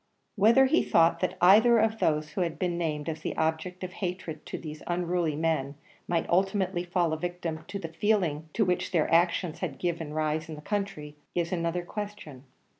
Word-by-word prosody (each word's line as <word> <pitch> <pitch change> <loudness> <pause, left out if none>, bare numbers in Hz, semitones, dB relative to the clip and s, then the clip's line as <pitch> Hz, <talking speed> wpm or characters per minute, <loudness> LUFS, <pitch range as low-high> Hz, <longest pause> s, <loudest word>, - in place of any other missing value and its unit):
Whether 230 +6 +6
he 300 +6 +3
thought 165 0 +3
that 185 - -1
either 220 +6 +7
of 220 0 +2
those 155 -4 +1
who 185 - -2
had 170 -2 -1
been 180 -2 -1
named 155 -3 -2
as 160 -1 -4
the - - -4
object 160 +4 -1
of 185 0 -5
hatred 175 -4 -5
to - - -4
these 155 -1 -8
unruly 175 -2 0
men 150 -3 -1 0.3
might 170 -1 0
ultimately 190 -1 +1
fall 175 -2 0
a 160 - -3
victim 175 -2 -4
to 200 - -5
the 165 -4 -7
feeling 165 -6 0
to 215 - +2
which 180 -1 0
their 165 -5 +2
actions 170 0 +2
had - - -4
given 170 -3 -2
rise 155 +1 -1
in 155 - -5
the 150 - -10
country, 195 -6 -4 0.2
is 170 -1 0
another 170 0 -1
question. 200 -10 -7
175 Hz, 190 wpm, -28 LUFS, 160-185 Hz, 0.3 s, either